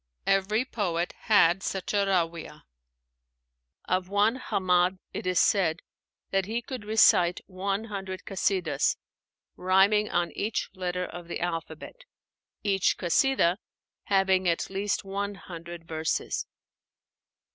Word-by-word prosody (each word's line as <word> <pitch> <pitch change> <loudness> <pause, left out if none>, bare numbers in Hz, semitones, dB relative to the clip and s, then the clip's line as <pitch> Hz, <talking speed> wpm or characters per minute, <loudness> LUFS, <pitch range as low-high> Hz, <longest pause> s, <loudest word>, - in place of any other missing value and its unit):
Every 205 +5 +2
poet 180 -8 -2
had 190 -4 +5
such 190 0 -3
a - - +2
Ráwiah. 170 -4 -1 1.2
Of 185 0 -1
one 210 +5 +2
Hammád 185 -4 +1 0.2
it - - -4
is 180 -1 +2
said 170 -5 +2 0.5
that 195 -1 +1
he 230 +2 -2
could 245 -3 -7
recite 195 -5 +4
one 195 +2 -2
hundred 195 -4 -6
Kasídahs 185 -6 0 0.6
rhyming 195 +3 +3
on 175 0 0
each 215 +2 -3
letter 180 -1 -3
of 175 -1 -9
the 170 - -4
alphabet, 165 - -5 0.7
each 195 -3 +2
Kasídah 180 0 +2 0.5
having 190 -2 +3
at 170 +2 -1
least 195 +1 -1
one 200 +1 -3
hundred 170 -2 -9
verses. 160 -1 -2
190 Hz, 115 wpm, -27 LUFS, 175-200 Hz, 1.2 s, had